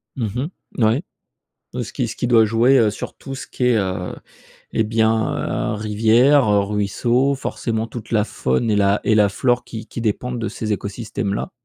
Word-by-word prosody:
Mmh 125 +4 -2 0.3
mh. 120 - +1
Ouais. 115 +8 +2 0.7
Ce - - -4
qui - - -2
ce - - -7
qui - - -1
doit 115 -2 +5
jouer, 120 +5 +4
heu, 110 -3 +4
sur 105 - -7
tout 135 - -8
ce 130 - -7
qui 125 - -3
est, 125 -2 +4
heu, 95 -3 -2 0.6
et 110 - +1
bien, 110 0 0
heu, - - -2
rivière, 110 +6 +3 0.2
ruisseau 120 +6 +1
forcément 115 -4 -3
toute 115 -1 -9
la 105 -3 +2
faune 105 - -1
et 105 - +2
la 100 0 +3
et 110 - +3
la 105 -1 +5
flore 120 +4 +1
qui 115 -2 -8
qui - - -7
dépendent 120 +3 -1
de 115 -2 -2
ces 110 0 -3
écosystèmes-là. 100 0 -4
110 Hz, 185 wpm, -20 LUFS, 105-120 Hz, 0.7 s, doit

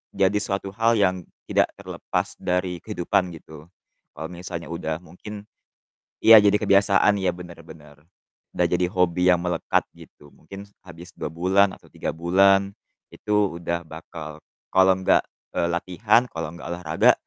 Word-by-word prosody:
jadi 100 +2 +2
suatu 95 0 -3
hal 115 +1 +2
yang 95 -2 +1 0.3
tidak - - +2
terlepas - - -4
dari 90 -1 -1
kehidupan 90 +1 -1
gitu. 80 0 -13 0.5
Kalau 80 - -6
misalnya 85 -2 -7
udah 80 -2 -3
mungkin 100 +5 -10 0.8
iya, 110 -1 +10
jadi 105 0 +4
kebiasaan, 100 0 +4
iya 95 - +2
benar-benar. 80 -4 -13 0.5
Udah 90 - +2
jadi 90 +1 +1
hobi 90 0 +1
yang 90 - +2
melekat 90 -2 0
gitu, 75 - -17
mungkin 100 +1 -11 0.2
abis 85 0 -12
2 - - -4
bulan 95 +3 +2
atau - - -22
3 - - -4
bulan, 95 +3 +3 0.4
itu 105 -4 -1
udah 85 0 -3
bakal 80 -1 -9 0.3
kalau 95 0 +5
nggak, 95 - +3 0.3
e - - 0
latihan, 105 +8 +1
kalau 80 -1 -5
nggak 85 - -10
olahraga, 80 -2 +3
90 Hz, 140 wpm, -23 LUFS, 85-100 Hz, 0.8 s, iya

